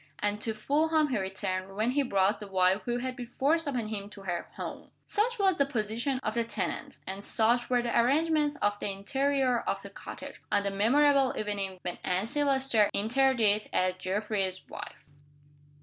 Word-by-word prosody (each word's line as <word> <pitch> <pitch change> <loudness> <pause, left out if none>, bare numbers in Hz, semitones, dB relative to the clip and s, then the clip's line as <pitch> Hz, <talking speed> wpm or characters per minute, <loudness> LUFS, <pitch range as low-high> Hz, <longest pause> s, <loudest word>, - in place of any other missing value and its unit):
And 210 0 -1
to 225 0 -1
Fulham 305 +6 +2
he 240 -5 0
returned, 190 0 -3
when 220 +4 +1
he 285 +2 +2
brought 200 -5 +2
the 210 - -8
wife 190 +1 +2
who 240 0 0
had 255 +1 -3
been 245 -2 -7
forced 300 +6 +1
upon 250 -5 -1
him 200 -2 -5
to 205 -1 -12
her 175 -2 -3
"home." - - -7 0.2
Such 475 +4 +1
was 385 -3 +3
the 280 - +5
position 235 +2 -1
of 215 - -1
the 235 0 +1
tenant, 220 -4 -4
and 195 +1 -6
such 235 +3 +2
were 245 -1 +2
the 235 - -1
arrangements 295 +4 +3
of 205 0 +1
the - - -2
interior 260 +5 +1
of - - -3
the - - -9
cottage, - - -9
on 200 - +2
the 200 - -1
memorable 270 +6 +3
evening 200 -3 -3
when 180 - -4
Anne 185 +3 0
Silvester 265 -5 +3
entered 260 +5 +2
it 210 -1 +3
as 185 0 +1
Geoffrey's 190 0 -2
wife. - - -9
225 Hz, 185 wpm, -29 LUFS, 200-270 Hz, 0.2 s, the